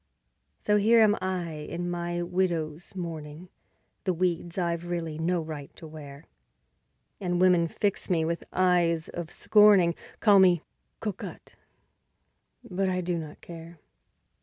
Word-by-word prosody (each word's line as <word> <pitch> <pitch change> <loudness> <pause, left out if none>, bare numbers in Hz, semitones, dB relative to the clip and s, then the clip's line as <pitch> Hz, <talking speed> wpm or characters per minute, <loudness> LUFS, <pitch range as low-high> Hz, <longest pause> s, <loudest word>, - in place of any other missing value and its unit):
So 210 0 +1
here 225 +3 +5
am 210 -1 +5
I 185 -3 -2
in 165 +3 -5
my 175 0 -2
widow's 175 -2 -2
mourning, 165 -1 -7 0.6
The 185 -2 +1
weeds 175 0 -1
I've 170 -1 -1
really 165 -3 -3
no 175 +2 +1
right 150 -3 -7
to - - -11
wear; 150 -1 -10 0.9
And 175 -3 -1
women 180 -2 +4
fix 200 +5 -2
me 165 -3 +2
with 170 +1 -2
eyes 175 -3 +2
of 175 -2 -6
scorning, 205 -5 +5 0.3
Call 205 -3 +6
me 180 -3 +5 0.4
"cocotte", 210 -4 -6 1.1
but 190 +1 -1
I 185 0 -1
do 175 -1 -2
not 155 -2 -9
care. 170 0 -10
175 Hz, 135 wpm, -27 LUFS, 165-185 Hz, 1.1 s, Call